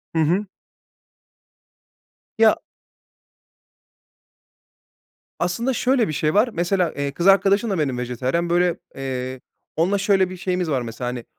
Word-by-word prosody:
Hı -, -, +2 dB
hı. 180 Hz, +7 st, +1 dB, 1.9 s
Ya 220 Hz, -1 st, +5 dB, 2.8 s
Aslında 205 Hz, +10 st, 0 dB
şöyle 250 Hz, -1 st, +2 dB
bir 155 Hz, -, -3 dB
şey 155 Hz, +1 st, 0 dB
var: 210 Hz, +5 st, +4 dB
Mesela, 175 Hz, 0 st, 0 dB
eee, 140 Hz, 0 st, -2 dB
kız 170 Hz, +6 st, -1 dB
arkadaşım 200 Hz, +3 st, +4 dB
da 190 Hz, -5 st, -1 dB
benim 135 Hz, -4 st, -1 dB
vejetaryen, 125 Hz, +7 st, -2 dB
böyle, 175 Hz, 0 st, +2 dB, 0.2 s
eee, 130 Hz, -1 st, -4 dB, 0.3 s
onunla 180 Hz, +5 st, +2 dB
şöyle 195 Hz, -2 st, +2 dB
bir 185 Hz, -, -8 dB
şeyimiz 180 Hz, -2 st, -2 dB
var 135 Hz, -4 st, 0 dB
mesela, 120 Hz, +1 st, -5 dB
hani, 125 Hz, -1 st, -6 dB
175 Hz, 125 wpm, -22 LUFS, 135-195 Hz, 2.8 s, Ya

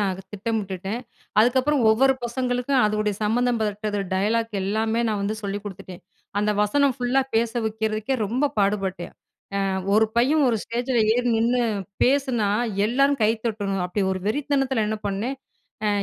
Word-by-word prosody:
நான் 195 Hz, -2 st, +1 dB
அத 190 Hz, +1 st, -8 dB
திட்டமிட்டுட்டேன். 205 Hz, 0 st, -3 dB, 0.4 s
அதுக்கப்புறம் 260 Hz, +5 st, +3 dB
ஒவ்வொரு 265 Hz, +5 st, +4 dB
பசங்களுக்கும் 250 Hz, +2 st, 0 dB
அதுவுடைய 210 Hz, 0 st, 0 dB
சம்பந்தம் 240 Hz, +3 st, +1 dB
பட்டது 210 Hz, 0 st, -2 dB
டயலாக் 225 Hz, +4 st, 0 dB
எல்லாமே 220 Hz, +3 st, 0 dB
நான் 210 Hz, -2 st, -1 dB
வந்து 205 Hz, +2 st, -1 dB
சொல்லி 200 Hz, 0 st, -3 dB
குடுத்துட்டேன். 190 Hz, -2 st, -9 dB, 0.4 s
அந்த 210 Hz, +1 st, +1 dB
வசனம் 275 Hz, +5 st, +2 dB
ஃபுல்லா 255 Hz, +1 st, +1 dB
பேச 225 Hz, 0 st, +2 dB
வக்கிறதுக்கே 220 Hz, +2 st, -1 dB
ரொம்ப 255 Hz, +8 st, 0 dB
பாடுபட்டேன். 195 Hz, -3 st, -1 dB, 0.5 s
அ -, -, 0 dB, 0.3 s
ஒரு 220 Hz, +1 st, +4 dB
பையன் 280 Hz, +5 st, +4 dB
ஒரு 225 Hz, -, +1 dB
ஸ்டேஜில 240 Hz, +1 st, 0 dB
ஏறி 245 Hz, 0 st, 0 dB
நின்னு 240 Hz, +2 st, +2 dB, 0.4 s
பேசுனா, 255 Hz, -6 st, +2 dB, 0.4 s
எல்லாரும் 275 Hz, +3 st, +2 dB
கைத்தட்டணும், 210 Hz, -4 st, 0 dB
அப்டி 195 Hz, +2 st, -1 dB
ஒரு 185 Hz, -, -5 dB
வெறித்தனத்ல 270 Hz, -3 st, 0 dB
என்ன 215 Hz, 0 st, -2 dB
பண்ணேன் 215 Hz, +7 st, -2 dB, 0.5 s
அ -, -, +3 dB
220 Hz, 140 wpm, -24 LUFS, 205-250 Hz, 0.5 s, ஒவ்வொரு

